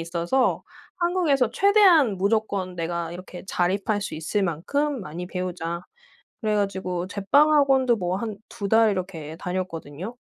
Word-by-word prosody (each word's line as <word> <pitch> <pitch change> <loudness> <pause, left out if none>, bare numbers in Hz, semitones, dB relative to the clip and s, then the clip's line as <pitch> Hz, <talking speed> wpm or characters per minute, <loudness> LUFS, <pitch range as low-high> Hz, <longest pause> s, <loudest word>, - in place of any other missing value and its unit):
있어서 170 +10 0 0.4
'한국에서 340 -9 +2
최대한 380 - +5
무조건 200 -2 0
내가 170 0 -3
이렇게 180 0 -9
자립할 195 +4 0
수 200 - -5
있을 160 +6 -1
만큼 265 - -1
많이 175 0 -6
배우자.' 175 -2 -4 0.6
그래 215 -2 0
가지고 190 -3 -2
제빵 205 +11 +3
학원도 270 -4 +4
뭐 180 -2 -1
한 215 -2 -5
2 205 -4 -5
달 225 +1 +5
이렇게 175 -5 -5
다녔거든요. 180 +2 -5
195 Hz, 305 characters per minute, -24 LUFS, 175-240 Hz, 0.6 s, 최대한